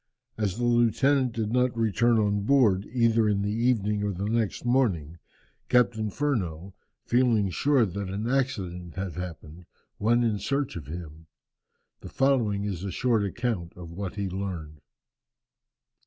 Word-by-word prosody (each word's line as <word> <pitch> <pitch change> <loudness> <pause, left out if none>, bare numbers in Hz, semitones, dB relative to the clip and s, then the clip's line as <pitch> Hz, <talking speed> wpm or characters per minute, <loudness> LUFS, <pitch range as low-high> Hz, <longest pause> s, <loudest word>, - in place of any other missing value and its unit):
As 105 -2 -2
the 120 - -2
lieutenant 120 +3 +3
did 110 -2 -2
not 125 0 +1
return 115 +1 +2
on 105 -1 +1
board 105 -5 +3
either 115 -3 +3
in 100 -1 +1
the 105 +1 -1
evening 110 -3 +1
or 105 0 -1
the 100 +2 -3
next 115 0 -1
morning, 95 - +1 0.5
Captain 115 -3 +2
Furneaux, 95 - -2 0.3
feeling 120 -6 +2
sure 135 - +3
that 100 0 -4
an 100 +4 -3
accident 95 - -2
had 95 -2 -4
happened, 85 -1 -8 0.4
sent 120 +2 +3
in 110 -3 0
search 140 +7 -1
of 80 -6 -7
him. 80 0 -8 0.7
The - - -10
following 120 -7 +1
is 95 -4 -4
a 100 - -3
short 115 +2 +1
account 100 -4 -3
of 85 -2 -10
what 95 +2 -5
he 100 -1 -2
learned. 90 -6 -5
105 Hz, 150 wpm, -27 LUFS, 90-120 Hz, 0.7 s, lieutenant